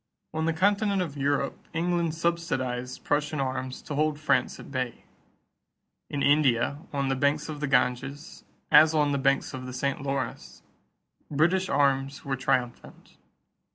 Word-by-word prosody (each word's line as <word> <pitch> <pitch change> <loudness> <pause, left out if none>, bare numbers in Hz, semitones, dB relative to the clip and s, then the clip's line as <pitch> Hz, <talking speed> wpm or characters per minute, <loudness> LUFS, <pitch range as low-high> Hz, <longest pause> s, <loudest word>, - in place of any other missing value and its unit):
On 160 0 -1
the 165 - +2
continent 200 +2 +2
of 150 -5 -7
Europe, 140 0 0 0.2
England 170 -1 0
subsidized 130 -7 -2
Prussian 150 0 0
arms 130 -1 -3
to 150 - -6
hold 150 0 0
France 140 -5 +1
at - - -11
bay. 130 -3 -3 1.1
In 145 -1 -2
India, 140 -2 +3
on 140 -2 -1
the 135 - +1
banks 145 +3 +1
of 150 -1 -5
the 150 - -1
Ganges, 135 +2 -1 0.3
as 155 +1 +7
on 150 -1 +3
the 140 - 0
banks 135 0 +1
of 130 -1 -6
the 125 - -7
St. 140 +2 -2
Lawrence, 135 -3 -4 0.7
British 175 +6 +2
arms 140 0 +1
were 135 -1 -1
triumphant. 125 -2 -3
140 Hz, 150 wpm, -27 LUFS, 130-155 Hz, 1.1 s, as